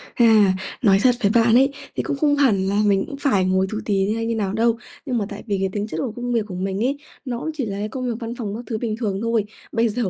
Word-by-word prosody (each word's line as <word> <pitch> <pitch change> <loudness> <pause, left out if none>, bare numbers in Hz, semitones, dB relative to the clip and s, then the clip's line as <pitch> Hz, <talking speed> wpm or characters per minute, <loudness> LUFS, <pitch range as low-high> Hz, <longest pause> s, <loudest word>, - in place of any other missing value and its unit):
À, 215 -5 +5 0.3
nói 195 -5 +5
thật 250 -1 +5
với 200 0 +3
bạn 230 0 +5
ấy, 270 +2 +5 0.2
thì - - -1
cũng 280 - -2
không 290 0 +3
hẳn 210 -10 +3
là 200 +2 +2
mình 195 -1 +3
cũng 280 - -7
phải 210 -10 +2
ngồi 190 +1 +2
tù 215 - -2
tì 195 0 +1
hay 225 0 -2
như 230 0 -1
nào 200 -3 -1
đâu, 230 +1 +2 0.3
nhưng 250 -3 -1
mà 210 - 0
tại - - -8
vì 200 -2 0
cái 195 0 0
tính 205 +1 -3
chất - - -5
của 250 -5 -2
công 245 0 -3
việc 225 -3 +1
của 185 - -7
mình 190 +3 -2
ấy 275 +3 0 0.3
nó 240 -2 -3
cũng 320 - -4
chỉ 275 -6 -2
là 200 -1 -4
cái 210 +1 -3
công 255 +1 -4
việc 240 - -1
văn 235 +1 -5
phòng 210 -4 -4
các 240 - -6
thứ 225 - -2
bình 220 -2 -2
thường 210 -4 -2
thôi. 230 -2 +1 0.3
Bây 230 0 +2
giờ, 215 -3 -1
225 Hz, 295 wpm, -22 LUFS, 200-245 Hz, 0.3 s, À